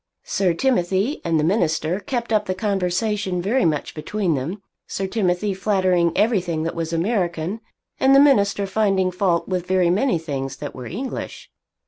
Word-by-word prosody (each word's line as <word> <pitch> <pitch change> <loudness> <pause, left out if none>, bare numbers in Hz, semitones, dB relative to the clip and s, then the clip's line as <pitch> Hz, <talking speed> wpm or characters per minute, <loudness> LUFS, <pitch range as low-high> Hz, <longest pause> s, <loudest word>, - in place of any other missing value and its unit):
Sir 180 -4 0
Timothy 200 - 0
and 165 -2 +1
the - - +1
minister 165 -1 +1
kept 235 0 -3
up 210 -1 +1
the 185 - -1
conversation 195 0 -1
very 220 +9 +1
much 155 -3 -1
between 180 +3 -1
them, 150 +9 -3 0.3
Sir 195 - -3
Timothy 190 -1 0
flattering 185 -3 +2
everything 185 -7 +1
that 165 - -2
was 165 -1 -3
American, 175 +1 -1 0.4
and 270 +1 +5
the - - +8
minister 205 -8 +4
finding 195 -2 +1
fault 180 -2 0
with 180 -2 -2
very 185 -2 +3
many 235 +2 +2
things 135 -4 -4
that 145 +1 -7
were 125 -2 -8
English. 255 +9 -6
185 Hz, 160 wpm, -22 LUFS, 170-210 Hz, 0.4 s, the